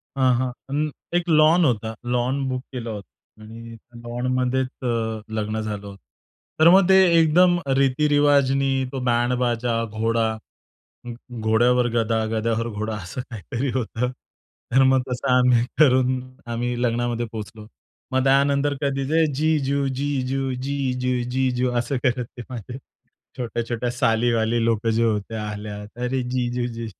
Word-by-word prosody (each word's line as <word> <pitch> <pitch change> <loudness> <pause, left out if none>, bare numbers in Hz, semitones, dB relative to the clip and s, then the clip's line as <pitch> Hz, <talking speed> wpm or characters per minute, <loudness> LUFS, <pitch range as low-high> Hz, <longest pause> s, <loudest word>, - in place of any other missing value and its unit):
हां, 130 -2 +3
हां. 130 -1 -1 0.2
अं, 150 +2 0 0.3
एक 175 0 -2
लॉन 160 +2 +5
होता. 110 -3 0
लॉन 125 +3 0
बुक 130 0 -2
केला 120 -2 -5
होता 105 +1 -12
आणि 115 +1 -10 0.3
लॉनमध्येच 125 +2 -1 0.2
अ, 115 -2 -1 0.2
लग्न 110 +1 -2
झालं 105 -2 -5
होतं. 100 -1 -10 0.6
तर 160 +1 +7
मग 190 +1 +6
ते 190 - +7 0.2
एकदम 175 +3 +4 0.2
रीतिरिवाजनी. 140 -1 +2
तो 135 - -4
बँड-बाजा, 120 -1 0
घोडा, 115 +1 0 1.1
घोड्यावर 120 +3 +3
गदा, 115 -1 +1
गद्यावर 115 +1 -1
घोडा 110 0 -4
असं 95 +6 -6
काहीतरी 115 +3 -4
होतं. 125 +1 -2 0.6
तर 135 +1 +6
मग 130 0 +4
तसं 125 +2 -3
आम्ही 125 -2 +4 0.2
करून 130 -3 +4 0.3
आम्ही 120 +1 -2
लग्नामध्ये 120 0 0
पोहोचलो. 110 0 -8 0.4
मग 130 0 +1
त्यानंतर 140 +1 +3
कधीच 135 -1 -1 0.3
जीजू, 140 -2 +1
जीजू, 135 -1 -2
जीजू, 130 -2 -1 0.2
जीजू 125 -1 0
असं 120 +3 -2
करत 125 -2 +1
ते - - -5
माझे 125 0 -7 0.6
छोट्या-छोट्या 120 0 -3
सालीवाली 115 -1 +1
लोकं 115 -1 +1
जे 115 +1 +1
होत्या, 110 0 -1
आल्या. 105 0 -6
तर 125 +2 -2 0.2
जीजू 125 -1 -1
जी 115 0 -5
125 Hz, 130 wpm, -23 LUFS, 115-135 Hz, 1.1 s, तर